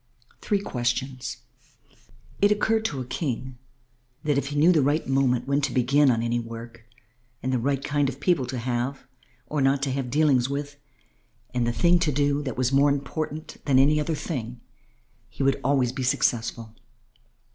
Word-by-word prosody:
THREE 205 -2 0
QUESTIONS 125 0 -2 1.0
It - - +6
once - - 0
occurred 220 +1 0
to 140 -11 -2
a - - -5
King 130 -2 -4 0.6
that 150 -1 +1
if 140 -1 0
he 145 - -5
knew 155 +5 +5
the 160 -4 +4
right 145 +4 +1
moment 130 -2 +1
when 140 +1 +1
to 140 -2 -1
begin 135 +4 +3
on 115 -2 +1
any 120 +1 0
work 115 0 -9 0.6
and 130 +1 -1
the 125 - +1
right 140 +2 -1
kind 145 -1 +1
of 135 0 -8
people 145 -5 +1
to 125 +1 -4
have 125 +3 -3 0.4
or 150 -2 -2
not 135 +1 +2
to 135 - 0
have 130 -1 -2
dealings 135 -3 +3
with 145 +1 -4 0.8
and 120 -1 0
the - - +2
thing 175 +7 +3
to 165 -3 +1
do 145 +1 +1
that 135 -3 -5
was 130 0 +1
more 140 +1 +4
important 150 +2 -4
than 140 -3 +3
any 145 +3 +5
other 155 +2 -1
thing, 125 -7 -5 0.7
he - - -4
would 135 0 +1
always 130 -3 +2
be 130 +1 -5
successful. 115 -4 0
135 Hz, 180 wpm, -25 LUFS, 125-145 Hz, 1.0 s, It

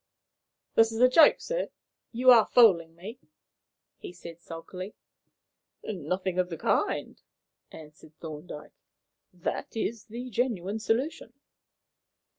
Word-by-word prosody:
"This 225 0 +4
is 225 - -5
a 250 - +7
joke, 300 +5 +6
sir; - - -3 0.4
you 255 +2 +5
are 230 -3 +6
fooling 170 -9 +4
me," 200 +8 -10 0.8
he - - -8
said 170 -1 -12
sulkily. 180 +4 -9 0.9
"Nothing 185 0 -3
of 180 -1 0
the 165 - -6
kind," - - -1 0.5
answered 155 0 -14
Thorndyke. 150 -1 -9 0.6
"That 180 +4 -5
is 225 0 -3
the 245 +3 -8
genuine 215 -3 -1
solution." 240 +8 -2
190 Hz, 110 wpm, -28 LUFS, 170-235 Hz, 0.9 s, a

